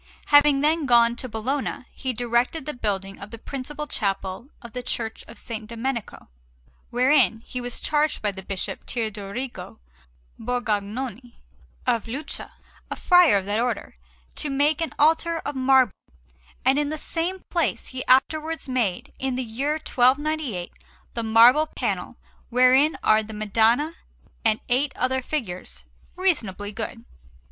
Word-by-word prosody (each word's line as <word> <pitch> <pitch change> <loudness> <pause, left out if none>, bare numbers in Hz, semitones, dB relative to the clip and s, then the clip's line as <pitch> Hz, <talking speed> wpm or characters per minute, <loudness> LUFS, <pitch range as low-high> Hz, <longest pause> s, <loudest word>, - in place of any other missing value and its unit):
Having 290 -1 +6
then 305 0 +2
gone 235 -1 +5
to 255 - -5
Bologna, 255 +4 -3
he 260 - -3
directed 245 +5 0
the 300 - -3
building 195 -4 -3
of 200 - -9
the 230 - -9
principal 280 +5 -6
chapel 195 -2 -2
of 235 -4 -12
the 250 - -4
Church 225 -2 -3
of - - -12
S. - - -8 0.2
Domenico, 235 0 -4 0.6
wherein 250 -3 +3
he 250 +2 -6
was 245 0 -4
charged 300 0 +1
by 210 - 0
Bishop 190 -1 -5
Teodorigo 220 +2 -5 0.6
Borgognoni 240 +1 -3 0.5
of 230 -1 +1
Lucca, 280 +6 -5 0.4
a - - -3
friar 355 - +5
of 190 - -3
that 205 +2 0
Order, 235 - -2 0.4
to 295 - -3
make 290 +3 +1
an 325 - -1
altar 325 +2 +3
of 290 - -2
marble; 260 -4 +4 0.7
and 270 +2 +4
in 295 -1 0
the 310 - -3
same 345 +4 -3
place 340 -3 -1
he 260 0 -4
afterwards 310 +5 +2
made, 240 -8 -1
in 265 -1 -1
the 255 - -1
year 255 +6 -1
1298, 270 - +1 0.4
the 230 - -2
marble 235 +7 +6
panel - - -3 0.3
wherein 255 +5 +4
are 215 0 +5
the 220 0 -9
Madonna 225 +8 +2 0.5
and 220 -2 +2
eight 265 +3 +1
other 260 +1 0
figures, 180 - -5 0.3
reasonably 220 - 0
good. 230 +2 -6
250 Hz, 140 wpm, -24 LUFS, 220-290 Hz, 0.7 s, Having